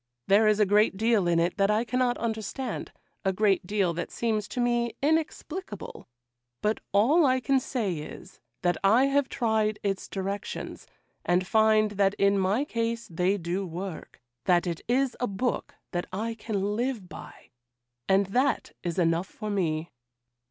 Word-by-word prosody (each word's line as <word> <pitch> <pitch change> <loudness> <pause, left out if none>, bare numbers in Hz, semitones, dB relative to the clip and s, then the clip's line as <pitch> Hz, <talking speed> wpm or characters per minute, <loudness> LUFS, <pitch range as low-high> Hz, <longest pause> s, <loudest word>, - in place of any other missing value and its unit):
There 210 +2 +5
is 215 0 +3
a 210 - +5
great 205 0 +3
deal 220 -3 +2
in 170 -1 +3
it 170 +4 0
that 195 0 +3
I 215 +2 +2
cannot 245 +1 +1
understand—a 220 -3 -4
great 195 -2 +2
deal 195 -4 +1
that 170 - -4
seems 215 -3 -1
to - - -5
me 240 -1 +1
inexplicable; 315 - -2 0.6
but 210 +1 +1
all 255 - +4
I 260 0 +3
can 270 +1 +2
say 230 -7 -2
is, 170 +4 -10 0.2
that 175 -2 +2
I 225 +7 +5
have 275 0 +1
tried 220 -3 +1
its 195 -1 -2
directions, 195 +1 -5 0.4
and 180 +1 +2
find 215 +1 +3
that 200 0 +2
in 200 0 +3
my 200 +9 +1
case 230 -3 -2
they 180 +4 +1
do 180 +2 -2
work; 180 0 -7 0.3
that 175 -1 +3
it 170 -2 -3
is 255 +2 +1
a 245 - 0
book 205 +5 -2 0.2
that 175 -1 -2
I 220 +5 -2
can 210 -2 -2
live 240 -4 -2
by, - - -12 0.6
and 195 +1 +4
that 255 +8 0
is 170 -2 -3
enough 170 +1 +2
for 215 0 -6
me. 165 -4 -1
210 Hz, 160 wpm, -27 LUFS, 190-235 Hz, 0.6 s, There